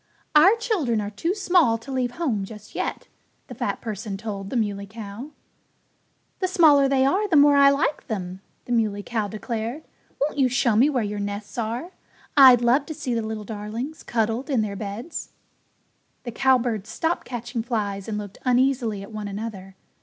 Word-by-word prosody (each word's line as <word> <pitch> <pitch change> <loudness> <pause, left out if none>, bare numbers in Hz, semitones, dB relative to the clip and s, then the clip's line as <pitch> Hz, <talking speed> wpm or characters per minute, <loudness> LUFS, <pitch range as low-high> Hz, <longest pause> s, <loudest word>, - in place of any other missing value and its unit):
"Our 330 +8 +7
children 370 - 0
are 205 0 -4
too 330 - -2
small 350 - +3
to 230 +5 -10
leave 255 -2 0
home 245 -12 -1
just 210 +1 -11
yet," - - -4 0.4
the - - -10
fat - - -3
person 210 -3 -5
told 200 -2 -6
the - - -5
Muley 200 -3 -1
Cow. 215 +5 -8 1.1
"The 370 - +1
smaller 310 -7 +5
they 265 -1 +3
are 390 +10 +2
the 355 - +1
more 290 0 +7
I 280 0 +7
like 280 +2 0
them," 185 -3 -5 0.2
the - - -7
Muley 215 -4 +1
Cow 220 -2 -2
declared. 225 +6 -4 0.4
"Won't 290 +1 -1
you 260 -2 +4
show 240 -2 +2
me 255 +7 +5
where 255 -6 0
your 205 0 -3
nests 205 0 -5
are? 235 +10 -3 0.4
I'd 255 -4 +8
love 255 +4 +3
to 315 - -5
see 265 -5 -3
the 230 - 0
little 220 -1 -5
darlings 225 +8 -6
cuddled 230 +4 -1
in 260 -6 +2
their 200 -2 -4
beds." 210 - -6 0.9
The 240 - -5
cowbirds 240 -4 +1
stopped 330 +1 -2
catching 240 -1 -4
flies 205 -5 -3
and 215 -1 -3
looked 205 -1 -7
uneasily 245 -5 +1
at 200 - -11
one 215 -1 -5
another. 200 -2 -6
235 Hz, 180 wpm, -24 LUFS, 210-275 Hz, 1.1 s, I'd